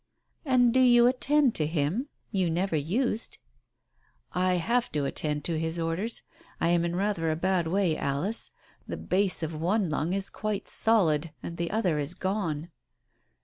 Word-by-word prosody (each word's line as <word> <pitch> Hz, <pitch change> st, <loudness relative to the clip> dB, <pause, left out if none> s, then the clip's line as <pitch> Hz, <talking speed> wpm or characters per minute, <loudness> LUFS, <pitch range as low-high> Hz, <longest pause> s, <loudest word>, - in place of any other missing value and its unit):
"And 250 Hz, -3 st, +3 dB
do 260 Hz, -, +4 dB
you 240 Hz, -2 st, +6 dB
attend 265 Hz, +1 st, +3 dB
to 155 Hz, -, 0 dB
him? 165 Hz, -, -1 dB, 0.2 s
You 190 Hz, -5 st, +1 dB
never 175 Hz, +1 st, -1 dB
used." 210 Hz, -, -1 dB, 0.5 s
" -, -, -40 dB, 0.2 s
I 185 Hz, 0 st, +2 dB
have 235 Hz, +8 st, 0 dB
to 145 Hz, -2 st, 0 dB
attend 150 Hz, +1 st, -1 dB
to 165 Hz, -2 st, -1 dB
his 160 Hz, +1 st, -3 dB
orders. 170 Hz, +7 st, -3 dB, 0.4 s
I 165 Hz, -, +1 dB
am 170 Hz, -1 st, +3 dB
in 170 Hz, 0 st, -2 dB
rather 190 Hz, -4 st, 0 dB
a 155 Hz, -, 0 dB
bad 180 Hz, 0 st, 0 dB
way, 180 Hz, -2 st, +1 dB
Alice. 145 Hz, +12 st, -1 dB, 0.4 s
The -, -, -5 dB
base 190 Hz, -2 st, +1 dB
of 160 Hz, 0 st, -3 dB
one 175 Hz, +3 st, 0 dB
lung 155 Hz, +3 st, -1 dB
is 195 Hz, 0 st, +1 dB
quite 215 Hz, -2 st, -3 dB
solid... 165 Hz, -8 st, +3 dB
and 170 Hz, -, -6 dB
the 170 Hz, 0 st, -2 dB
other 185 Hz, -8 st, 0 dB
is 145 Hz, +4 st, -3 dB
gone." 175 Hz, -5 st, -3 dB
180 Hz, 170 wpm, -27 LUFS, 160-215 Hz, 0.5 s, you